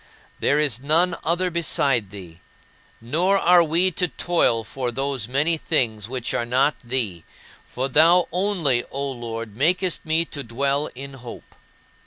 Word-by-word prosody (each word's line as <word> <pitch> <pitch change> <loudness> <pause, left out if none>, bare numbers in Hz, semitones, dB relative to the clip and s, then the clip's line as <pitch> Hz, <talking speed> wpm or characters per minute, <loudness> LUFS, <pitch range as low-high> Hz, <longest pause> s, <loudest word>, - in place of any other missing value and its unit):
There 145 - +2
is 145 -7 +1
none 165 +6 +2
other 175 +2 0
beside 140 - +1
thee, 90 -4 -11 0.6
nor 170 +12 +1
are 175 -2 +5
we 170 +4 +2
to 180 +2 0
toil 135 -4 +1
for 125 +1 -4
those 135 -3 -3
many 145 +6 +1
things 115 -10 -1
which 125 -2 -4
are - - 0
not 130 +5 +2
thee, 115 -9 -2 0.4
for 125 - -5 0.5
only 175 -9 +1
thou, - - -18
O 140 0 -3
Lord, 115 -3 -6
makest 175 - +1
me 160 +1 +1
to 145 -2 -7
dwell 140 +5 -1
in 140 +2 -8
hope." 120 -1 -11
140 Hz, 150 wpm, -22 LUFS, 120-165 Hz, 0.6 s, are